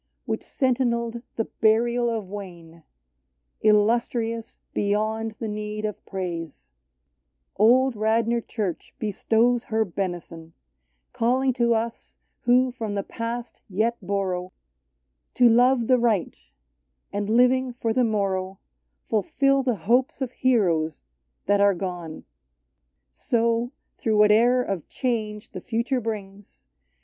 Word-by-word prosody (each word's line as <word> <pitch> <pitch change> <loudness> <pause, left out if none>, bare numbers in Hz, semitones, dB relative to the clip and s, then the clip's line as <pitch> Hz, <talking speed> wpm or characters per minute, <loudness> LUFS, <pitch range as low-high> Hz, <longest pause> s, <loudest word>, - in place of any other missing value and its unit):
DAVIDS - - -50
Which - - -1
sentineled 235 -3 0
the 225 - -1
burial 235 +2 +2
of 220 -4 -3
Wayne, 175 -4 -9 0.4
— 65 -1 -51
Illustrious 230 +1 0
beyond 215 +2 -1
the 225 - -4
need 210 0 -4
of 210 -2 -5
praise, 170 - -5 0.4
— 65 0 -52
Old 250 +4 +4
Radnor 225 +2 +1
Church 205 -6 -5
bestows 230 +3 +1
her 220 0 0
benison, 175 -3 -5 0.6
Calling 255 +3 +2
to* 235 -2 +2
us 230 +1 -4 0.3
who 250 +1 +4
from 225 -4 -4
the 200 - -1
past 230 +3 -5
yet 220 +5 +1
borrow, 185 -2 -2 0.8
To 245 - +6
love 245 +1 +4
the 255 +1 +4
right, 225 -6 +1 0.8
and 205 0 -2
living 250 +2 +3
for 235 -2 -2
the 255 - +2
morrow, 195 -4 -1 0.5
Fulfill 275 +6 +2
the 250 -3 0
hopes 240 +11 +1
of 260 -3 -3
heroes 175 - +1 0.4
that 205 0 +3
are 200 -1 +4
gone. 175 -3 -6 0.9
So, 230 - 0 0.3
through 220 -2 +1
whate'er 225 +4 +5
of 195 -8 -4
change 215 -4 -3
the - - -7
future 245 +3 -1
brings. 200 - -7
220 Hz, 120 wpm, -25 LUFS, 195-240 Hz, 0.9 s, To